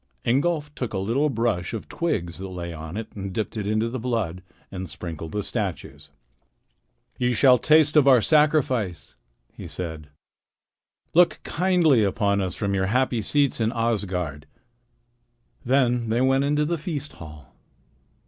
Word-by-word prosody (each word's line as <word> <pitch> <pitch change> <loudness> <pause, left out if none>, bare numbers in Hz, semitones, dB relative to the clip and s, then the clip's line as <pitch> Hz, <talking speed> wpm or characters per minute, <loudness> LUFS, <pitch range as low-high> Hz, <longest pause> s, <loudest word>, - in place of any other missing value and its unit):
Ingolf 150 +4 0
took 125 -6 -5
a - - 0
little 120 +10 +1
brush 115 -6 -1
of 110 - -7
twigs 90 - -2
that 95 - -5
lay 85 -2 -6
on 80 +3 -7
it 110 0 -6
and 100 -1 -5
dipped 110 +4 -3
it 105 -2 -3
into 110 +2 +1
the 125 +2 -4
blood 110 -8 -2 0.3
and 95 -2 -6
sprinkled 80 -2 -7
the 105 -1 -2
statues. 100 -7 -5 1.1
"You 125 0 +1
shall 125 +1 +6
taste 155 +1 +4
of 145 -3 +5
our 130 -3 +7
sacrifice," 130 - +2 0.4
he - - -9
said. 80 -4 -6 1.0
"Look 175 +1 +4
kindly 170 - +3
on 100 0 +1
us 90 -2 -3
from 100 -1 -2
your 95 -1 0
happy 125 +1 +1
seats 140 +2 +1
in 110 0 +1
Asgard." 90 -10 -2 1.2
Then 125 -3 +2
they 115 +2 +1
went 135 +1 +3
into 150 +1 +1
the 170 +1 -1
feast 150 -2 -5
hall. 75 -3 -12
115 Hz, 150 wpm, -24 LUFS, 95-140 Hz, 1.2 s, our